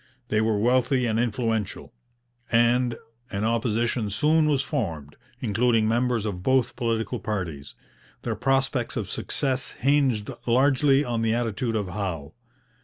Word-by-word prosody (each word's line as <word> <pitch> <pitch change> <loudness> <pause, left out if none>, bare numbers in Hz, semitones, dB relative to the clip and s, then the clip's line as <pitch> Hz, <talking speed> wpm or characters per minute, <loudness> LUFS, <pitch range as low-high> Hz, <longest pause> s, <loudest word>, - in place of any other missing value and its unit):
They 110 0 +2
were 110 -1 +1
wealthy 125 +3 +2
and 110 -1 0
influential, 115 -3 -2 0.6
and 120 +1 +3 0.3
an 100 0 -3
opposition 115 0 0
soon 155 +9 +2
was 140 -3 +2
formed, 80 - -4 0.3
including 115 -1 +2
members 120 -1 +1
of 95 -4 -3
both 130 +4 +1
political 115 -3 -1
parties. 85 -10 -4 0.5
Their 115 -2 -2
prospects 135 +1 0
of - - -2
success 135 -2 -2
hinged 130 -6 +1 0.2
largely 135 +3 +3
on 120 -2 -1
the 115 0 +1
attitude 115 0 -1
of 105 -4 -1
Howe. 85 -6 -4
115 Hz, 130 wpm, -25 LUFS, 105-130 Hz, 0.6 s, and